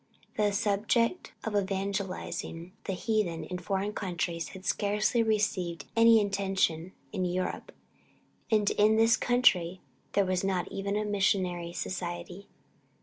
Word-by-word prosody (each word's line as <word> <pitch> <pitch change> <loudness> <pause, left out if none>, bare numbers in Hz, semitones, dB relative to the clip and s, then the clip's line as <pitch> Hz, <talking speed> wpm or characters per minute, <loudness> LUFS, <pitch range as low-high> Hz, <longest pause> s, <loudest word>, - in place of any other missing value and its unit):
The 210 -1 +2
subject 215 - +1
of 220 -2 -3
evangelizing 195 -3 -3
the 195 - -2
heathen 185 -5 -1
in 180 +3 -5
foreign 195 +3 -2
countries 170 -4 -2
had 190 0 -11
scarcely 210 +4 +1
received 195 -7 0
any 230 0 +7
attention 190 -3 0 0.2
in 190 -3 -1
Europe, 180 +1 -2 0.8
and 215 -2 +2
in 215 +1 +4
this 225 +1 +5
country 190 -8 +3 0.3
there 200 - +3
was 185 0 0
not 190 -2 -1
even 200 +1 -2
a 210 0 0
Missionary 185 -4 0
Society. 175 +2 -5
195 Hz, 125 wpm, -29 LUFS, 180-210 Hz, 0.8 s, any